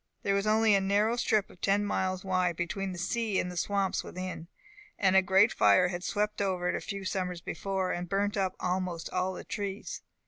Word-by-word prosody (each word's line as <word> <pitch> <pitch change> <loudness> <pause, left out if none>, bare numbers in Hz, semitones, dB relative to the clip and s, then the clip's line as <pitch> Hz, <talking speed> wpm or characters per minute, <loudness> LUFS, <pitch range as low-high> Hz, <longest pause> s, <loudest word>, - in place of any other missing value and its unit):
There 200 - +1
was 200 +1 0
only 220 0 +4
a 195 - +4
narrow 205 +4 +2
strip 215 -4 +1
of 180 - -19
ten 200 +1 +2
miles 185 -2 -1
wide, 185 -2 +1
between 190 +3 -3
the 180 - -7
sea 210 +3 0
and 180 - -2
the - - -8
swamps 195 +1 0
within, 185 -2 -6 0.5
and 190 -1 +3
a 190 - +7
great 190 +3 +4
fire 180 -1 +5
had 175 -1 -4
swept 210 +1 -1
over 185 -3 0
it - - 0
a - - -3
few 200 -1 -5
summers 180 -2 -2
before, 190 +3 -2
and 175 0 -4
burnt 200 +2 0
up 190 -2 0
almost 180 -2 -2
all 185 +1 0
the - - -7
trees. 200 -1 -5
190 Hz, 210 wpm, -30 LUFS, 180-200 Hz, 0.5 s, a